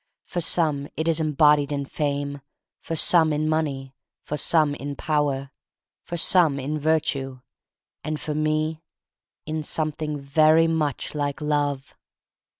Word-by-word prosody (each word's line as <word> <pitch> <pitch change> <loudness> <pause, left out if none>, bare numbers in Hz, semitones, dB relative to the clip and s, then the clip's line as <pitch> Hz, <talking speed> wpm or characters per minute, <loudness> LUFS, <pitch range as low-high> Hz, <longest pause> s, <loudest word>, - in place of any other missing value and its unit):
For 175 - -3
some 155 -4 +1
it 160 +1 -2
is 165 -1 +2
embodied 150 -1 +3
in 140 -1 -2
Fame, 140 0 -3 0.4
for 165 - -5
some 160 0 +5
in 150 +1 0
Money, 140 -4 -2 0.3
for 150 - -4
some 150 0 +2
in 145 0 -6
Power, 140 -3 -1 0.5
for 175 - -6
some 165 -4 +3
in 150 +3 -3
Virtue 145 -4 -1 0.3
— - - -66
and 155 -1 -3
for 150 - -4
me 155 +1 -1 0.6
in 155 0 -3
some 155 +1 -1
thing 150 0 -4
very 155 +3 +4
much 155 -4 -1
like 145 0 -2
love. 145 -2 -1
150 Hz, 145 wpm, -24 LUFS, 140-155 Hz, 0.6 s, some